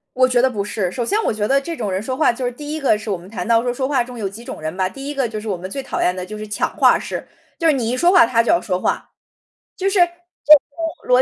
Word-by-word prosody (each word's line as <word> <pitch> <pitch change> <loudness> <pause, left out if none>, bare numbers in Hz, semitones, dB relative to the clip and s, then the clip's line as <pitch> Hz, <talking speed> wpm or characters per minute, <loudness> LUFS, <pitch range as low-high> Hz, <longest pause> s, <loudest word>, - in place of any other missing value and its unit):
我 255 0 +4
觉 250 -1 +3
得 260 - +4
不 210 -5 -3
是。 195 -3 -2
首 240 - -2
先 420 - +1
我 - - +1
觉 210 -1 -1
得 275 +1 +3
这 335 +4 -5
种 215 -7 -3
人 185 0 -1
说 255 +5 -4
话 310 - +3
就 250 +2 -5
是 245 - -2
第 295 +4 -7
一 315 - -3
个 265 -6 +3
是 210 0 -6
我 195 - 0
们 175 +1 -13
谈 190 -4 -5
到 230 -1 +5
说 245 0 -1
说 260 +1 -2
话 265 -4 +1
中 250 0 -10
有 210 -4 -2
几 215 +5 -11
种 155 - -8
人 155 +3 -4
吧。 185 -1 +1
第 275 +7 -8
一 295 - -4
个 270 -4 0
就 215 -1 -5
是 220 - -7
我 190 - -1
们 185 +2 -7
最 275 +7 -5
讨 - - -4
厌 180 - +2
的 185 0 -5
就 215 +3 -8
是 215 - -6
抢 210 - -2
话 - - +5
式， - - -6 0.3
就 330 - 0
是 320 - +6
你 240 -5 -1
一 250 - -1
说 345 +7 +4
话 360 - +7
他 230 0 +2
就 - - 0
要 340 - +3
说 185 -3 -2
话。 - - -2 0.7
就 390 - -1
是 390 -1 +1
就 - - +9 1.0
我 - - -14
235 Hz, 350 characters per minute, -20 LUFS, 205-275 Hz, 1.0 s, 就